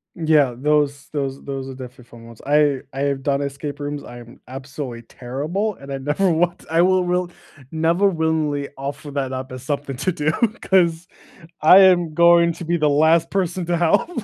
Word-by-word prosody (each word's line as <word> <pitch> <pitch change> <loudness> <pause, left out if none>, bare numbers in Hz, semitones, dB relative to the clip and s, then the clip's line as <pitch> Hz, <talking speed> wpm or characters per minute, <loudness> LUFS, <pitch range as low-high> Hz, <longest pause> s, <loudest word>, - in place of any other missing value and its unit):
Yeah, 155 -7 +2
those 145 0 0
those 135 -2 -3
those 135 -1 -6
are - - -7
definitely 125 -1 -11
fun 115 -1 -15
ones. 115 -1 -14
I 145 -2 +3
I 135 +1 -5
have 140 -1 -1
done 140 0 0
escape 140 +1 -5
rooms, 145 0 -5
I 120 - -11
am 120 0 -15
absolutely 130 -2 -7
terrible, 155 - -4
and 140 0 -9
I - - -3
never 150 +8 0
want 175 +2 -1
I 165 +1 +3
will 185 0 +3
will 180 0 -1 0.4
never 165 +5 +2
willingly 160 -4 -1
offer 140 +1 -7
that 135 -2 -3
up 130 0 -6
as 130 -1 -8
something 140 -1 -3
to 185 +7 -1
do, 155 -1 -1
because 185 -7 +1 0.5
I 180 +5 +8
am 175 -4 +4
going 170 0 +5
to 170 - -9
be 170 +1 0
the 150 -2 +2
last 160 +3 +3
person 180 -2 -1
to 175 0 0
help. 170 - +2
150 Hz, 190 wpm, -21 LUFS, 135-170 Hz, 0.5 s, I